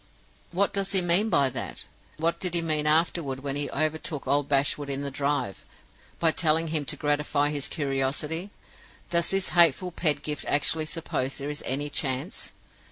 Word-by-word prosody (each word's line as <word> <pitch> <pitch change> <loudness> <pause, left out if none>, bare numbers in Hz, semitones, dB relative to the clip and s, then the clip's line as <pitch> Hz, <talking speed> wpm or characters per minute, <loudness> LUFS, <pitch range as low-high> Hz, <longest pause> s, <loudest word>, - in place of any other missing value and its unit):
"What 195 +3 +1
does 195 0 0
he 190 - +6
mean 175 +6 +4
by 140 -8 +2
that? 115 -4 -5 0.3
And 155 - -11
what 165 +1 +1
did 180 -2 -1
he 170 - +4
mean 155 -2 0
afterward 155 -4 +1
when 140 0 -2
he 145 0 -1
overtook 155 0 -2
old 145 +1 +1
Bashwood 140 +1 +1
in 140 0 -2
the 140 - -3
drive, 140 -6 -2 0.5
by 165 -1 +3
telling 160 0 +1
him 155 -2 0
to - - 0
gratify 145 0 0
his 145 -2 -1
curiosity? 145 +5 -2 0.6
Does 170 -1 +3
this 195 -1 0
hateful 175 +1 +4
Pedgift 150 -3 0
actually 155 +2 +1
suppose 135 -5 -3
there 145 +1 -4
is 145 - -4
any 145 +3 -1
chance 135 +5 -2
150 Hz, 170 wpm, -26 LUFS, 140-165 Hz, 0.6 s, he